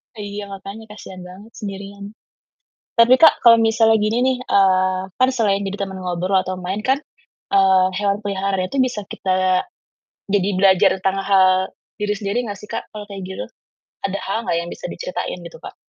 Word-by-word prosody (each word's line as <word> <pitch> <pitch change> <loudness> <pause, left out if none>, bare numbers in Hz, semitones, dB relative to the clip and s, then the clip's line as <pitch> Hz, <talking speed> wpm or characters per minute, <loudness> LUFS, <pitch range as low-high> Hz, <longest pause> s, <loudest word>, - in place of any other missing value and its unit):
Iya, 205 -1 -6
makanya 200 +2 -9
kasihan 190 -3 -11
banget 195 +5 -13
sendirian. 200 0 -8 0.8
Tapi, 230 +2 +6
Kak, 320 +3 +6
kalau 235 -2 +8
misalnya 225 0 +3
gini 215 +2 0
nih, 260 0 +2
eee, 185 -1 +3 0.2
kan 255 0 +4
selain 200 -5 +1
jadi 195 +1 -4
temen 190 -1 -6
ngobrol 185 +1 -1
atau 185 - -3
main 185 +2 -3
kan, 270 +2 +2 0.5
eee, 190 -1 +4
hewan 205 0 0
peliharaan 195 -2 -2
itu 275 - -4
bisa 255 -5 +1
kita 185 -1 0 0.7
jadi 200 -1 +2
belajar 190 +1 +5
tentang 190 0 +1
hal 190 -2 +5 0.5
diri 210 0 -1
sendiri 205 +2 -2
nggak 205 - -5
sih, 210 - -13
Kak, - - -4
kalau 210 - -6
kayak 195 -1 -7
gitu? 190 - -6 0.6
Ada 195 +1 -3
hal 195 - -2
nggak - - 0
yang 170 - -7
bisa - - -7
diceritain - - -5
gitu, - - -11
Kak? - - -10
200 Hz, 175 wpm, -20 LUFS, 190-220 Hz, 0.8 s, kalau